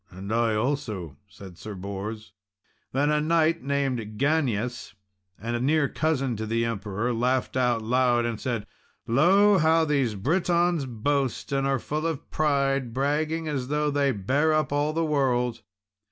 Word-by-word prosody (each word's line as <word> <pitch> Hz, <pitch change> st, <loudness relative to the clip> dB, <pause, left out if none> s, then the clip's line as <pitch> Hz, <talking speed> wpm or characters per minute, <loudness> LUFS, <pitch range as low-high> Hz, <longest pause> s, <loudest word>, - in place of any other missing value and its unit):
"And 95 Hz, +4 st, -6 dB
I 115 Hz, -1 st, +2 dB
also," 110 Hz, -, -2 dB
said 95 Hz, -3 st, -13 dB
Sir 105 Hz, -1 st, -7 dB
Bors. 100 Hz, +3 st, -6 dB, 0.6 s
Then 145 Hz, +3 st, +1 dB
a 150 Hz, 0 st, +2 dB
knight 165 Hz, +1 st, +2 dB
named 140 Hz, -2 st, -1 dB, 0.2 s
Ganius, 125 Hz, -7 st, -1 dB, 0.4 s
a 120 Hz, +2 st, -3 dB
near 145 Hz, +3 st, +2 dB
cousin 135 Hz, -6 st, 0 dB
of 110 Hz, -, -4 dB
the 115 Hz, +1 st, +1 dB
Emperor, 105 Hz, +1 st, -2 dB
laughed 125 Hz, +3 st, 0 dB
out 125 Hz, -3 st, +1 dB
aloud, 120 Hz, 0 st, +2 dB
and 115 Hz, -2 st, -3 dB
said, 115 Hz, -5 st, -2 dB, 0.4 s
"Lo! 190 Hz, -, +4 dB
how 160 Hz, +1 st, +4 dB
these 135 Hz, -7 st, 0 dB
Britons 170 Hz, -, +1 dB
boast 135 Hz, +4 st, -1 dB
and 135 Hz, 0 st, +1 dB
are 135 Hz, 0 st, +1 dB
full 150 Hz, +6 st, -3 dB
of 160 Hz, -4 st, -5 dB
pride, 140 Hz, -5 st, 0 dB
bragging 155 Hz, +4 st, 0 dB
as 135 Hz, -4 st, -2 dB
though 150 Hz, +1 st, 0 dB
they 140 Hz, -1 st, +2 dB
bare 135 Hz, +9 st, +1 dB
up 155 Hz, -2 st, +1 dB
all 145 Hz, +1 st, +1 dB
the 165 Hz, +1 st, 0 dB
world!" 125 Hz, -5 st, 0 dB
135 Hz, 155 wpm, -26 LUFS, 115-150 Hz, 0.6 s, Lo